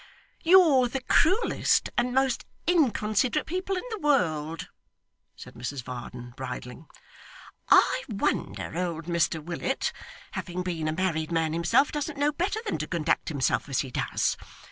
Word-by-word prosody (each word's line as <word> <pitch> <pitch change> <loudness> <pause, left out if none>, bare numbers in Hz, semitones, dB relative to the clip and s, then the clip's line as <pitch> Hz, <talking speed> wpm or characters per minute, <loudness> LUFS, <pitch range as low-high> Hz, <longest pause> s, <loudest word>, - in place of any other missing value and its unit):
'You're 325 -8 +6
the 265 +2 -4
cruellest 375 - +2
and 245 +1 +1
most 265 -1 +1 0.2
inconsiderate 255 - +2
people 370 +3 -2
in - - -4
the 435 - -4
world,' 165 - 0 0.7
said - - -11
Mrs 125 +2 -5
Varden, 120 -1 -8
bridling. 130 +3 -7 0.8
'I - - +5
wonder - - -2
old 170 -2 -2
Mr 170 -1 +1
Willet, 175 - -2 0.4
having 180 0 -4
been 165 -4 -2
a - - +1
married 165 -2 -1
man 165 -1 +1
himself, 230 - +3
doesn't 295 0 -3
know 290 +1 +2
better 370 +8 -1
than - - -2
to - - -3
conduct 165 -2 0
himself 145 -1 0
as 135 - +1
he 130 - -7
does. - - 0
180 Hz, 145 wpm, -27 LUFS, -, 0.8 s, You're